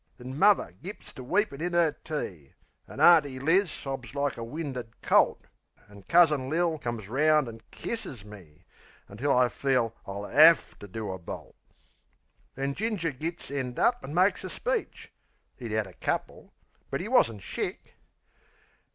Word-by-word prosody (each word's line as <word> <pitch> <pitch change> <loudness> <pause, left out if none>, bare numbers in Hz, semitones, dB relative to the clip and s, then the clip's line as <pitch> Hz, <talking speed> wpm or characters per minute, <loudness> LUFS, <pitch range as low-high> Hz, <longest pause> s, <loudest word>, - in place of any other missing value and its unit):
Then 125 +1 -8
muvver 195 - +4
gits 195 +5 -9
to 130 - -9
weepin' 175 - 0
in 175 +1 -2
'er 170 -3 +4
tea; 95 - -6 0.3
An' - - -10
Auntie 150 -6 +6
Liz 165 +8 +3
sobs 135 -3 -6
like 140 -3 0
a 115 - -6
winded 125 -3 -6
colt; - - +3 0.4
An' 100 -1 -14
Cousin 155 -6 +4
Lil 165 0 +1
comes 120 -6 -5
'round 150 +4 +3
an' 115 -1 -9
kisses 135 - -6
me; 95 -8 -14 0.4
Until 125 +8 -2
I 125 -1 +4
feel 125 -3 0
I'll 100 +1 -5
'AVE 160 +8 +5
to 100 - -10
do 105 +1 -5
a 95 - -6
bolt. 85 - -9 1.0
Then 135 +1 -2
Ginger 205 -4 -1
gits 160 +4 -6
end 130 -3 -3
up 245 0 +3
an' 145 - -6
makes 185 +3 +3
a - - -5
speech - - -3 0.5
('E'd 120 -3 -6
'ad 110 0 0
a 95 - -13
couple, - - -4 0.4
but - - -2
'e - - -4
wasn't 105 -4 +2
shick.) - - -5
135 Hz, 160 wpm, -28 LUFS, 115-165 Hz, 1.0 s, Auntie